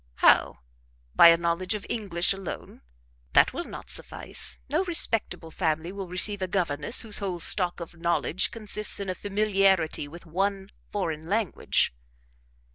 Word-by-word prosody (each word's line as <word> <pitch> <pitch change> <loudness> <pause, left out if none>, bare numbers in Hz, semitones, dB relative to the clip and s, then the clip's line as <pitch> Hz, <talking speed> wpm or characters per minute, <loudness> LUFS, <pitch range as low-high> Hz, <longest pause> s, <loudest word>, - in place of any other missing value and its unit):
"How? - - +4 0.5
By - - +9
a 165 0 +7
knowledge 170 +4 -1
of 205 - -6
English 195 -6 0
alone? 195 -2 -8 0.5
That - - +5
will - - -4
not - - -8
suffice; - - -2
no 310 +7 +1
respectable 225 - 0
family 160 0 -1
will 195 -1 -6
receive 190 +3 +1
a 185 - -1
governess 175 - 0
whose 220 -3 -2
whole 190 -4 -3
stock 180 +1 +2
of 170 0 -8
knowledge 170 +1 0
consists 210 -2 -3
in 200 -1 -4
a - - 0
familiarity 195 -6 +1
with 170 +5 -12
one 195 +3 -2 0.2
foreign 165 -5 -3
language." 210 - +1
185 Hz, 145 wpm, -27 LUFS, 170-205 Hz, 0.5 s, By